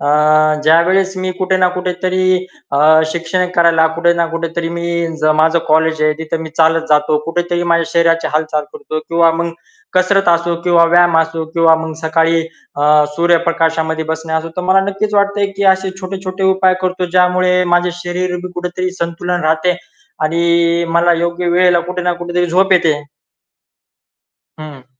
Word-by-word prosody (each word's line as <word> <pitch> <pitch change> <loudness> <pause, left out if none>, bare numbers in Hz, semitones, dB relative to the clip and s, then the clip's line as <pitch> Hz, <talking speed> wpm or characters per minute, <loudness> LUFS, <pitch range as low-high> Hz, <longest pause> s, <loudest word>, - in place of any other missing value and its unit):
अ, - - -4 0.6
ज्यावेळेस 185 +4 +2
मी 185 0 -3
कुठे 190 0 0
ना 185 -1 +2
कुठेतरी 185 0 -1 0.3
अ, 155 +3 +4
शिक्षण 170 +2 -2
करायला 165 -1 +3
कुठे 170 0 +2
ना 170 0 0
कुठेतरी 165 0 -4
मी 170 0 -3
ज - - -2 0.2
माझं 160 +1 +3
कॉलेज 160 0 +1
आहे 155 0 +3
तिथे 160 0 -4
मी 160 -1 -7
चालत 165 0 +2
जातो, 150 0 +2
कुठेतरी 175 +1 -2
माझ्या 170 -1 +1
शरीराची 165 -1 +2
हालचाल 155 -1 -1
करतो 220 -9 -6
किंवा 165 +1 +2
मग 170 +1 -3 0.4
कसरत 185 +1 +2
असो 170 0 +1
किंवा 170 -1 +4
व्यायाम 175 0 +3
असो 165 0 -1
किंवा 165 -1 +4
मग 160 - -6
सकाळी 165 +1 +1 0.4
अ, 150 +1 +3
सूर्यप्रकाशामध्ये 165 -2 0
बसणे 160 0 -5
असो, 160 +1 -2
तर 180 - -3
मला 185 +1 +3
नक्कीच 200 +2 -3
वाटतंय 200 0 +1
की 200 - -1
असे 190 0 -5
छोटे-छोटे 190 0 -5
उपाय 190 -1 +3
करतो 185 0 -2
ज्यामुळे 180 0 +2
माझ्या 175 0 +1
शरीर 180 +1 -3
भी 180 - -7
कुठेतरी 180 +1 -4
संतुलन 170 +1 -3
राहते 160 +3 +1 0.5
आणि 170 +1 +1
मला 170 +1 +2
योग्य 170 +1 -2
वेळेला 175 0 +3
कुठे 180 0 -4
ना 180 0 0
कुठेतरी 175 0 -2
झोप 190 +2 +2
येते. 165 -5 +2 1.6
हं. 150 -4 -11
170 Hz, 160 wpm, -15 LUFS, 165-180 Hz, 1.6 s, अ